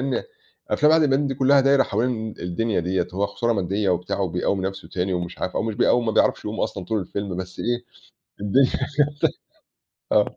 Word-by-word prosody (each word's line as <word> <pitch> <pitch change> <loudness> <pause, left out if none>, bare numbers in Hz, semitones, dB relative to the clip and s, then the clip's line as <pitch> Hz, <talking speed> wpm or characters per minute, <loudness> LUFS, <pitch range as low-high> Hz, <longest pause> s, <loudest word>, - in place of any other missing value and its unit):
لإن 135 0 -1 0.5
أفلام 150 +1 +4
عادل 160 -1 +5
إمام 145 +2 +2
دي 135 - -2
كلّها 140 +1 +4
دايّره 135 0 +4
حوالين 110 -1 -2
الدنيا 95 +4 -1
ديّة، 90 +1 0
هو 100 +2 +1
خسارة 115 +4 -1
مادية 100 0 0
وبتاع 90 +2 -1
وبيقوّم 95 +1 0
نفْسه 95 0 -6
تاني 90 +1 -2
ومش 90 0 -4
عارف، 90 - -3
أو - - +1
مش 110 -1 -2
بيقوّم 120 +1 +3
ما 110 - +1
بيعرفش - - +2
يقوم - - -4
أصلًا 95 - -2
طول 110 +3 -1
الفيلم 100 0 -4
بس 90 0 -7
إيه، 120 0 -1 0.6
الدنيا 125 +7 +3
كده - - -1 1.3
آه. - - +2
105 Hz, 190 wpm, -23 LUFS, 95-125 Hz, 1.3 s, عادل